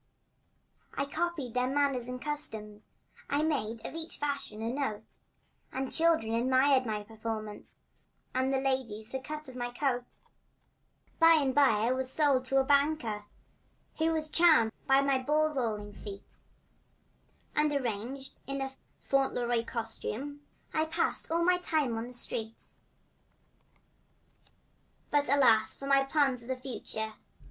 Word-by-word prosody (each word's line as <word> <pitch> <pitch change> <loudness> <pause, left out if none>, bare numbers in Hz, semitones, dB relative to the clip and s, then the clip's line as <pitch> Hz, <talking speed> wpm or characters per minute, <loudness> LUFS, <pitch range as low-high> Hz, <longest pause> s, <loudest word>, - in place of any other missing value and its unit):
I - - 0
copied 310 -4 -2
their 250 0 +1
manners 275 -3 +1
and 250 0 -5
customs 220 -8 -3 0.4
I 285 +2 +1
made 230 -8 -1
of - - -5
each 325 0 -4
fashion 280 -7 -3
a 230 +2 -1
note; 265 -7 -4 0.5
And 265 +1 -2
the - - -8
children 320 -9 +3
admired 260 +2 +3
my 210 -1 -2
performance 215 -1 -6 0.5
And 260 +1 +1
the 270 - +2
ladies 250 -5 -2
the 265 - -2
cut 300 +3 -6
of 260 - -10
my 245 -1 -3
coat. 245 -1 -2 1.0
By 330 -1 +8
and 275 -4 +2
by 260 -7 +4
I 240 - +2
was 260 0 -1
sold 280 -4 +3
to 270 +1 +1
a 270 - +5
banker 280 -7 +1 0.7
Who 320 +1 +3
was 315 -1 0
charmed 310 -9 +5 0.2
with 270 +1 +5
my 275 -1 +3
ball 305 +3 +1
rolling 215 -6 -2
feat, 200 -1 -10 1.1
And 300 0 +3
arrayed 260 0 -3 0.2
in 275 0 -2
a 270 0 -2 0.3
Fauntleroy 245 -4 +1
costume 245 +5 -5 0.3
I 315 0 +2
passed 325 +2 -1
all 335 +1 +1
my 360 +1 +4
time 305 -9 0
on 225 +1 -3
the 250 - -8
street. 225 -2 -4 2.4
But 290 -2 +2
alas 230 -6 +4
for 275 - -8
my 275 0 +4
plans 270 -3 +1
of 235 - -13
the 260 - -1
future! 225 -4 -5
265 Hz, 145 wpm, -31 LUFS, 230-290 Hz, 2.4 s, By